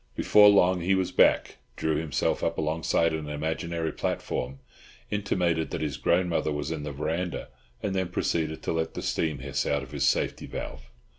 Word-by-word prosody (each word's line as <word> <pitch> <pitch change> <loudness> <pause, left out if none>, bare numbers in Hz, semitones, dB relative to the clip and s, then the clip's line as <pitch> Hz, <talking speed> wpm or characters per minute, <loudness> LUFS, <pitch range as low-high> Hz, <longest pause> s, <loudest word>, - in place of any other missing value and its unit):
Before 105 -1 +7
long 95 -3 +4
he 95 +3 +2
was 95 -1 0
back, - - +3 0.2
drew 80 -1 0
himself 75 -4 -1
up 85 - 0
alongside 80 +1 +1
an 80 -1 -4
imaginary 80 +2 -2
platform, 65 +2 -3 0.5
intimated 90 -6 0
that - - -4
his 75 -4 -2
grandmother 85 0 +1
was 75 +1 -3
in 80 -2 -3
the 75 0 -4
verandah, 80 +5 -3 0.3
and 100 - -1
then 95 -1 0
proceeded 80 -2 -1
to - - -1
let 80 0 -2
the - - -4
steam 80 -3 0
hiss 65 - -2
out 70 -1 0
of 65 - -11
his - - +1
safety - - 0
valve. 65 -2 -7
80 Hz, 175 wpm, -27 LUFS, 75-90 Hz, 0.5 s, Before